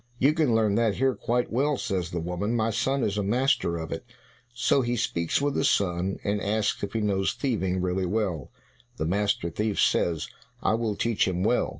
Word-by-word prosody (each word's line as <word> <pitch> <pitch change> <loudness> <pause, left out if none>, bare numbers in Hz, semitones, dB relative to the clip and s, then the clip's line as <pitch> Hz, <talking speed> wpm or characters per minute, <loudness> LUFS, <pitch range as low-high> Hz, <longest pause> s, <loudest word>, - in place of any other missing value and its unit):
"You 140 +5 +4
can 150 -8 +2
learn 110 -2 +3
that 115 -3 +2
here 130 +1 +2
quite 120 +2 -1
well," 140 +3 +1
says 90 -7 -2
the 85 - -3
woman, 90 +7 -2
"my 115 -1 +1
son 130 +4 0
is 105 0 0
a - - 0
master 110 -5 +1
of 80 -1 -6
it." - - -4 0.5
So 120 +3 +2
he 120 -1 -1
speaks 85 -7 0
with 145 0 0
the - - 0
son, 95 -7 +1
and 100 0 -1
asks 105 +1 0
if 100 0 -4
he 115 - 0
knows 95 -2 +1
thieving 95 -9 -1
really 90 0 0
well? 90 - -1 0.5
The - - -1
master 95 -1 0
thief 105 +3 -1
says, 85 -3 +2 0.4
"I 95 - +3
will 110 -2 -1
teach 115 -2 +1
him 90 -1 -1
well. 120 +4 +2
105 Hz, 205 wpm, -26 LUFS, 95-120 Hz, 0.5 s, You